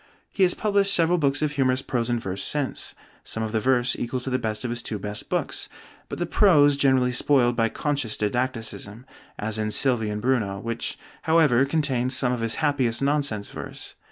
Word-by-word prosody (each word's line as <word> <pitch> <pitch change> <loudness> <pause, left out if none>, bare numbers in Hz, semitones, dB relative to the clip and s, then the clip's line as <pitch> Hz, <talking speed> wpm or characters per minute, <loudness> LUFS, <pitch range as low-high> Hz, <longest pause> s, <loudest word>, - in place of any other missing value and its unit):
He - - -4
has 180 -1 +4
published 200 -2 +1
several 170 +1 +3
books 145 0 +1
of 150 - +1
humorous 130 -2 +1
prose 120 -2 -1
and 120 -1 +1
verse 95 -2 -4
since; 145 -3 -2 0.3
some 110 - -4
of 110 - -3
the 110 - +1
verse 125 +2 +2
equal 120 +2 -3
to 130 - -5
the 130 - +1
best 110 -2 -3
of 120 - -2
his 120 0 -2
two 110 - -4
best 105 +1 -6
books, - - -2 0.4
but - - -5
the - - -1
prose 145 -8 +5
generally 130 -3 +3
spoiled 125 -1 +3
by 115 -1 +2
conscious 140 -6 -2
didacticism, 115 -1 -3 0.3
as 110 +1 -3
in 110 0 -1
'Sylvie 115 -1 +1
and 105 0 -3
Bruno,' 105 -5 0
which 115 +2 -4 0.2
however 150 -6 +4
contains 135 -4 0
some 125 -2 +1
of 120 - -3
his 115 0 -1
happiest 135 -4 0
nonsense 140 -8 0
verse. - - -8
125 Hz, 195 wpm, -24 LUFS, 115-140 Hz, 0.4 s, prose